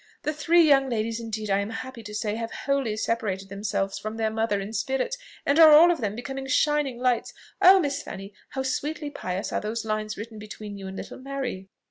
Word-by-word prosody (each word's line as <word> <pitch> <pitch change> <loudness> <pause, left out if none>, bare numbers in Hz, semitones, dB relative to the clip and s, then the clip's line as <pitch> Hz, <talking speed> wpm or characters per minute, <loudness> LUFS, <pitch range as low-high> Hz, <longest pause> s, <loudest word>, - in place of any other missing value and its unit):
"The 300 - -1
three 325 +3 +4
young 270 -2 +5
ladies 225 -1 -1
indeed, 215 -2 -4
I 195 - +3
am 200 +1 -2
happy 240 +2 -6
to 210 -1 -8
say, 210 -1 -1
have 230 +1 -3 0.2
wholly 275 -6 0
separated 200 -4 -2
themselves 195 -1 -2
from 215 +1 -5
their 220 -1 0
mother 220 -2 0
in 200 +3 -6
spirit, 265 - -1 0.3
and 285 +3 +3
are 315 -2 +10
all 335 +4 +8
of 330 - -2
them 210 -2 -1
becoming 270 +3 -5
shining 295 -2 +2
lights. 250 -1 0 0.3
Oh, 380 +1 +9
Miss 285 -4 -1
Fanny! 195 +1 -8 0.2
how 265 - -3
sweetly 295 +3 -2
pious 185 -6 -4
are - - 0
those 220 +2 -3
lines 215 0 -2
written 220 +1 -7
between 210 -1 -8
you 195 -1 -7
and 190 0 -7
little - - -7
Mary!" 260 -8 -5
230 Hz, 210 wpm, -26 LUFS, 210-275 Hz, 0.3 s, are